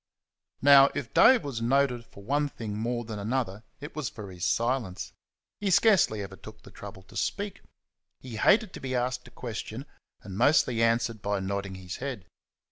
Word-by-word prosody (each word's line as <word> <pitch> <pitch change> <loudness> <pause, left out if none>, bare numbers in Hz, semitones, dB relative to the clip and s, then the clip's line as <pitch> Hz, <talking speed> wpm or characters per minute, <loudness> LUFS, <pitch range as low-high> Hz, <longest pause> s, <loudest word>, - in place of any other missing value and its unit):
Now, 140 0 +8
if 135 -6 -5
Dave 255 0 +6
was 130 -5 -4
noted 125 -1 +1
for 100 - -14
one 145 +6 0
thing 110 -6 -6
more 120 +2 -2
than 110 -2 -6
another 110 -2 -2 0.2
it 145 0 -9
was 150 -6 -2
for 100 -3 -9
his 90 -2 -4
silence. 115 -5 -1 0.5
He 205 - -1
scarcely 180 - +4
ever 95 0 -8
took 110 +2 -13
the - - -14
trouble 100 -1 -10
to - - -18
speak. 205 -1 -3 0.6
He 120 -4 -8
hated 205 - +3
to - - -7
be 130 -1 -3
asked 125 +1 -2
a - - -12
question, 115 +2 -6 0.4
and 95 - -8
mostly 125 -6 +3
answered 115 -1 +1
by 100 0 -1
nodding 100 0 -3
his 90 -1 -7
head. 125 -8 -5
115 Hz, 180 wpm, -28 LUFS, 105-140 Hz, 0.6 s, Now